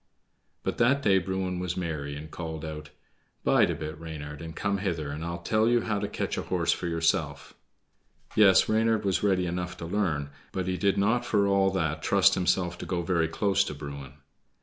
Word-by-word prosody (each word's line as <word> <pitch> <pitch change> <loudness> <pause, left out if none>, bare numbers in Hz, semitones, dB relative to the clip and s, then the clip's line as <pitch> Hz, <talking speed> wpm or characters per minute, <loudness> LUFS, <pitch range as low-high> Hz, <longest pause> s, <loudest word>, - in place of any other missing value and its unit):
But - - -3
that 140 +4 +3
day 95 -4 +5
Bruin 95 0 -2
was 90 -1 -3
merry, 75 -5 -3
and 75 +1 -9
called 80 -2 -5
out: 75 0 -7 0.5
"Bide - - +4
a - - -1
bit, 75 0 -6
Reynard, 75 -2 -7
and 80 -1 -8
come 100 -1 -1
hither, 85 -7 -2
and 75 +2 -5
I'll 85 0 -3
tell 110 +3 +2
you 120 -1 +3
how 110 -3 -1
to 105 - -2
catch - - -3
a - - -1
horse - - 0
for - - -2
yourself." 80 -4 -1 0.8
Yes, 100 -3 +6
Reynard 110 -1 +2
was 95 -3 +1
ready 95 -3 +2
enough 90 0 -3
to 85 - -6
learn, 85 -7 -1 0.2
but 95 -1 -2
he 95 0 -1
did 100 +2 +1
not 115 +5 +2
for 105 -4 +2
all 100 -1 +3
that 80 -4 -1
trust - - +4
himself 90 -1 0
to - - -6
go 85 -2 -1
very 85 -2 +1
close 100 +3 +1
to 75 - -5
Bruin. 70 -1 -8
90 Hz, 200 wpm, -28 LUFS, 80-100 Hz, 0.8 s, Yes